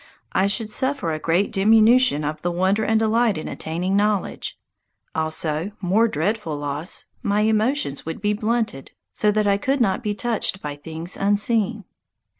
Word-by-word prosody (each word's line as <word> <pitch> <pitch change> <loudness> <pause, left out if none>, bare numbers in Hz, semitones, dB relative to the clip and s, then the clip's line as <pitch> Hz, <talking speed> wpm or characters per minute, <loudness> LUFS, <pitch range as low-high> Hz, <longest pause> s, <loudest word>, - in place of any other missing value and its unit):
I 190 - +2
should 215 +2 -2
suffer 260 - 0
a 155 - -3
great 170 +6 +1
diminution 220 - +4
of 150 +1 -3
the 175 - -1
wonder 190 +5 +1
and 220 0 +2
delight 225 -2 +2
in 155 - -5
attaining 175 +4 -2
knowledge; 205 -1 0 0.6
also 160 +3 -2
more 205 +5 +3
dreadful 170 -2 -2
loss 145 +4 -4 0.2
my 205 +1 +1
emotions 220 - +1
would 165 0 -5
be 210 +1 +1
blunted, 220 - -2 0.2
so 210 - +2
that 215 0 +1
I 200 -1 +3
could 270 +7 0
not 210 -2 +1
be 210 -3 -2
touched 225 -4 -1
by 150 -3 -5
things 160 +4 -6
unseen. 210 +2 +1
205 Hz, 160 wpm, -22 LUFS, 165-220 Hz, 0.6 s, diminution